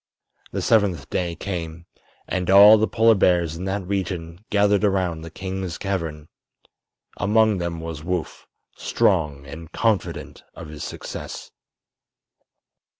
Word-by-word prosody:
The -, -, -3 dB
seventh 100 Hz, -9 st, +1 dB
day 85 Hz, -2 st, -1 dB
came, 85 Hz, -2 st, -5 dB, 0.4 s
and 90 Hz, -1 st, -2 dB
all 105 Hz, +3 st, +9 dB
the 110 Hz, -, +2 dB
Polar 115 Hz, 0 st, +4 dB
bears 85 Hz, -5 st, +2 dB
in 90 Hz, +3 st, -6 dB
that 95 Hz, 0 st, -2 dB
region 90 Hz, -2 st, -4 dB
gathered 105 Hz, 0 st, +3 dB
around 95 Hz, -5 st, 0 dB
the 80 Hz, -, -8 dB
king's 95 Hz, 0 st, -5 dB
cavern. 80 Hz, -6 st, -4 dB, 0.9 s
Among 105 Hz, +1 st, +2 dB
them 85 Hz, -1 st, -3 dB
was 80 Hz, -2 st, -6 dB
Woof, 90 Hz, -1 st, -4 dB, 0.3 s
strong 70 Hz, -3 st, 0 dB
and 80 Hz, +3 st, -10 dB
confident 110 Hz, -4 st, -1 dB
of -, -, -9 dB
his 75 Hz, -1 st, -8 dB
success. -, -, -7 dB
90 Hz, 125 wpm, -23 LUFS, 80-100 Hz, 0.9 s, all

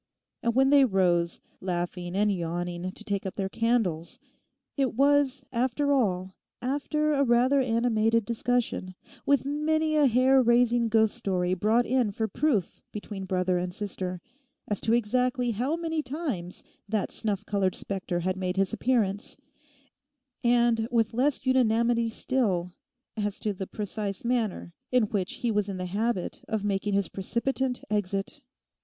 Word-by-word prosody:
And 235 Hz, 0 st, 0 dB
when 270 Hz, +1 st, +4 dB
they 285 Hz, -1 st, +7 dB
rose, 180 Hz, -6 st, +2 dB, 0.2 s
laughing 175 Hz, 0 st, -3 dB
and 205 Hz, +1 st, +3 dB
yawning 175 Hz, 0 st, -3 dB
to 215 Hz, -, -6 dB
take 200 Hz, -3 st, -2 dB
up 190 Hz, -, -5 dB
their 195 Hz, -1 st, -2 dB
candles, 225 Hz, -5 st, 0 dB, 0.6 s
it 265 Hz, -5 st, 0 dB
was, 280 Hz, 0 st, +3 dB
after 260 Hz, +4 st, 0 dB
all, 190 Hz, -8 st, 0 dB, 0.3 s
after 300 Hz, +3 st, 0 dB
a 280 Hz, -1 st, +3 dB
rather 255 Hz, +2 st, +3 dB
animated 230 Hz, -2 st, +2 dB
discussion, 235 Hz, -5 st, -1 dB, 0.3 s
with 280 Hz, -2 st, +3 dB
many 310 Hz, +2 st, 0 dB
a 295 Hz, -2 st, +5 dB
hair 260 Hz, +2 st, +4 dB
raising 240 Hz, -1 st, +3 dB
ghost 220 Hz, -1 st, +3 dB
story 185 Hz, -6 st, 0 dB
brought 220 Hz, +6 st, +2 dB
in 250 Hz, -3 st, +2 dB
for 220 Hz, +2 st, -2 dB
proof 220 Hz, -, -1 dB
between 205 Hz, -2 st, -6 dB
brother 185 Hz, -1 st, 0 dB
and 180 Hz, 0 st, -4 dB
sister, 185 Hz, -3 st, -4 dB, 0.5 s
as 205 Hz, -, -2 dB
to 225 Hz, -, +1 dB
exactly 245 Hz, +2 st, +1 dB
how 250 Hz, +8 st, -1 dB
many 325 Hz, -2 st, -2 dB
times 260 Hz, -, -4 dB, 0.3 s
that 215 Hz, -1 st, -1 dB
snuff 210 Hz, -2 st, -1 dB
coloured 195 Hz, -3 st, 0 dB
spectre 185 Hz, -3 st, -3 dB
had 185 Hz, +2 st, -1 dB
made 185 Hz, 0 st, -2 dB
his 195 Hz, +2 st, +1 dB
appearance; 215 Hz, -4 st, 0 dB, 1.1 s
and, 235 Hz, -2 st, +3 dB
with 230 Hz, -2 st, +1 dB
less 260 Hz, +3 st, +1 dB
unanimity 235 Hz, -2 st, +2 dB
still, 205 Hz, -7 st, 0 dB, 0.4 s
as 205 Hz, -2 st, -2 dB
to 210 Hz, -, -1 dB
the 190 Hz, 0 st, -6 dB
precise 205 Hz, -1 st, -4 dB
manner 225 Hz, -8 st, -1 dB, 0.2 s
in 250 Hz, -2 st, +4 dB
which 195 Hz, -4 st, -1 dB
he 235 Hz, -, +2 dB
was 210 Hz, -1 st, 0 dB
in 195 Hz, -, -4 dB
the 180 Hz, -, -3 dB
habit 200 Hz, +1 st, -2 dB
of 220 Hz, -2 st, -2 dB
making 200 Hz, 0 st, 0 dB
his 200 Hz, -1 st, +1 dB
precipitant 250 Hz, +5 st, -2 dB
exit. 200 Hz, +6 st, -2 dB
220 Hz, 150 wpm, -27 LUFS, 190-250 Hz, 1.1 s, they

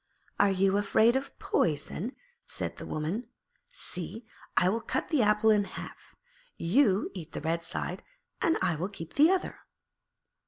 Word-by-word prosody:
'Are 205 Hz, -, +5 dB
you 195 Hz, +1 st, +2 dB
afraid 220 Hz, +3 st, +4 dB
of 270 Hz, +1 st, -3 dB
poison?' 170 Hz, -, -1 dB, 0.3 s
said -, -, -4 dB
the -, -, -7 dB
woman. 175 Hz, +10 st, -3 dB, 0.4 s
'See, 185 Hz, +6 st, -3 dB, 0.3 s
I 180 Hz, -, +5 dB
will 225 Hz, +5 st, +1 dB
cut 260 Hz, -, -2 dB
the 300 Hz, -5 st, +3 dB
apple 210 Hz, +1 st, +4 dB
in 210 Hz, -1 st, +4 dB
half: -, -, -10 dB, 0.4 s
you 200 Hz, +2 st, +3 dB
eat 170 Hz, -4 st, -8 dB
the -, -, -4 dB
red 165 Hz, +2 st, -1 dB
side 175 Hz, +2 st, -3 dB, 0.4 s
and 330 Hz, -2 st, +3 dB
I 180 Hz, -2 st, +2 dB
will 170 Hz, +5 st, -3 dB
keep 165 Hz, -5 st, -9 dB
the 300 Hz, +4 st, +6 dB
other.' 375 Hz, -1 st, 0 dB
200 Hz, 155 wpm, -29 LUFS, 175-230 Hz, 0.4 s, the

